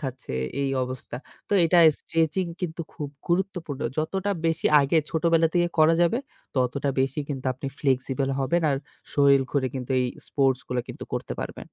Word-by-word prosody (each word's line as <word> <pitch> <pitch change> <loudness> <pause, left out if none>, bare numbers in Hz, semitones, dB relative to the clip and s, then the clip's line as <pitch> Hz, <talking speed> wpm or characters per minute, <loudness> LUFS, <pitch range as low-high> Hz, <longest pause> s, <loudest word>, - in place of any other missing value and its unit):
খাচ্ছে 130 - -6 0.3
এই 135 - 0
অবস্থা। 130 -1 -5 0.3
তো - - -3
এটা 175 +1 +4 0.2
স্ট্রেচিং 165 +3 0
কিন্তু 170 -2 -3
খুব 150 -3 -5 0.2
গুরুত্বপূর্ণ। 175 -5 -1 0.2
যতটা 190 +6 -1 0.2
বেশি 165 0 +1
আগে 140 +4 +2
ছোটবেলা 165 0 +3
থেকে 175 0 +3
করা 155 +1 +6
যাবে 175 +8 +2 0.4
ততটা 130 +3 0
বেশি 135 +3 0
কিন্তু 135 -2 -4
আপনি 130 +2 -7
ফ্লেক্সিবল 135 0 0
হবেন 170 +6 +1
আর 135 - +1 0.4
শরীর 140 -1 +5
ঘরে 140 -3 +1
কিন্তু 130 0 -5
এই 125 - +1 0.2
স্পোর্টস 135 -2 +1
গুলো 125 -1 0
কিন্তু - - -7
করতে - - -3
পারবেন। - - -8
145 Hz, 165 wpm, -25 LUFS, 135-165 Hz, 0.4 s, করা